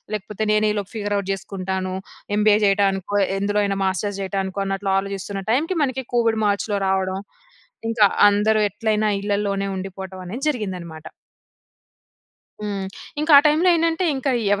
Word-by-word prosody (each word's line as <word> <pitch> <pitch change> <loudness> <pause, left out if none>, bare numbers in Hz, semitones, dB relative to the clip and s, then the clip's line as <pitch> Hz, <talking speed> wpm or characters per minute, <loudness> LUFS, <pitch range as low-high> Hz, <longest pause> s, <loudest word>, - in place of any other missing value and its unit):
లేకపోతే 210 +1 -5
నేనే 215 0 +3
ఈలోపు 205 -1 -4
ఫిగర్ 205 -1 -2
ఔట్ 195 -1 -4
చేసుకుంటాను. 190 -1 -4 0.4
ఎంబీఏ 210 0 +5
చేయటానికో 195 0 +1 0.2
ఎందులో 205 +1 0
అయినా 195 -1 -1
మాస్టర్స్ 200 +1 -1
చేయటానికో 195 0 -3
అన్నట్లు 195 0 -2
ఆలోచిస్తున్న 195 0 -4
టైమ్‌కి, 325 +8 0
మనకి 265 -1 -3
కోవిడ్ 225 -2 +2
మార్చ్‌లో 205 0 0
రావడం. 190 0 0 0.7
ఇంకా 225 -2 +3 0.2
అందరు 215 +1 +2
ఎట్లైనా 215 +1 0
ఇళ్ళలోనే 200 -1 -1
ఉండిపోవటం 190 0 -7
అనేది 235 +11 -5
జరిగిందనమాట. 180 - -4 1.5
హ్మ్, 200 -2 -3 0.3
ఇంకా 310 0 +2
ఆ - - +8
టైమ్‌లో 315 +5 +3
ఏంటంటే 330 +2 +1
ఇంకా 270 +1 -1 0.2
ఎవరైనా 200 - -4
205 Hz, 135 wpm, -22 LUFS, 195-215 Hz, 1.5 s, ఆ